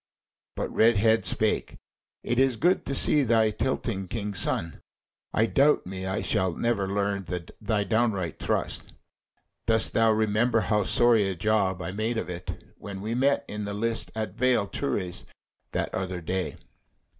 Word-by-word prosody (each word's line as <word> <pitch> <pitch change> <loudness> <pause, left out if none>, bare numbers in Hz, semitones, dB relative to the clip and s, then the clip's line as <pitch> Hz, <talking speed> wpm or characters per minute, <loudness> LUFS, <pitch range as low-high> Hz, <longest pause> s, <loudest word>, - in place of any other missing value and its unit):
But - - -4
Redhead 110 -1 +4
spake: - - 0 0.5
"It 120 +1 0
is 135 -2 +3
good 175 - +2
to 140 - -2
see 150 - +5
thee 110 -4 +3
tilting, 105 -4 -2
King's 105 -1 -3
Son. 85 0 -1 0.5
I 110 - +2
doubt 140 +6 +3
me 95 0 -5
I 95 0 -2
shall 95 -2 0
never 115 -5 0
learn 100 -1 -1 0.3
thy 105 -1 0
downright 105 -6 0
thrust. - - -2 0.7
Dost 110 -1 +2
thou 115 0 +4
remember 110 +2 +2
how 105 -2 +1
sorry 115 -4 +4
a 95 - -3
job 95 -1 0
I 95 - -4
made 110 +4 -2
of 90 - -3
it, 90 0 -7 0.2
when 100 -1 -7
we 110 +3 -3
met 135 +3 +2
in 105 0 -5
the 100 0 -4
lists 115 +2 0
at 110 -1 -3
Vale 125 -3 +2
Turris 100 -7 -3 0.5
that - - -2
other 95 -1 -3
day?" 90 +2 -3
110 Hz, 155 wpm, -27 LUFS, 95-115 Hz, 0.7 s, see